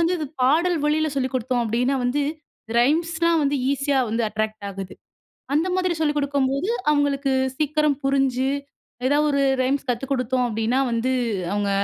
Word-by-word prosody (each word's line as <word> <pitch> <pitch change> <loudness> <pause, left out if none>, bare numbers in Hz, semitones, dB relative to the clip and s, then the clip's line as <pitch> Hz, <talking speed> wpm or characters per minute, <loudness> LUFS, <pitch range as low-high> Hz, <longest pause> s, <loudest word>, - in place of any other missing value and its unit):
வந்து 335 +2 +2
இது 310 - -3 0.2
பாடல் 330 +6 +3
வழியில 310 +1 +2
சொல்லிக் 260 0 -1
குடுத்தோம் 250 -1 0
அப்டின்னா, 250 +5 0
வந்து, 260 +4 +1 0.6
ரைம்ஸ்லாம் 330 +5 +2
வந்து 285 +1 +1 0.2
ஈஸியா 275 -1 +1
வந்து, 230 +2 0
அட்ராக்ட் 215 -1 -3
ஆகுது. 190 -1 -7 0.6
அந்த 320 +5 +2
மாதிரி 365 -2 +1
சொல்லிக் 300 -1 +1
குடுக்கும்போது, 280 +4 0 0.2
அவுங்களுக்கு 285 -2 +1 0.3
சீக்கிரம் 300 -2 +1
புரிஞ்சு, 270 -1 +1 0.6
எதாவது 295 +2 +3
1 280 0 +2 0.2
ரைம்ஸ் 270 +1 -1
கத்துக் 255 +3 -2
குடுத்தோம் 255 -1 0
அப்டின்னா 225 +3 0
வந்து, 230 +3 0 0.4
அவுங்க 205 -1 0
275 Hz, 145 wpm, -23 LUFS, 250-300 Hz, 0.6 s, பாடல்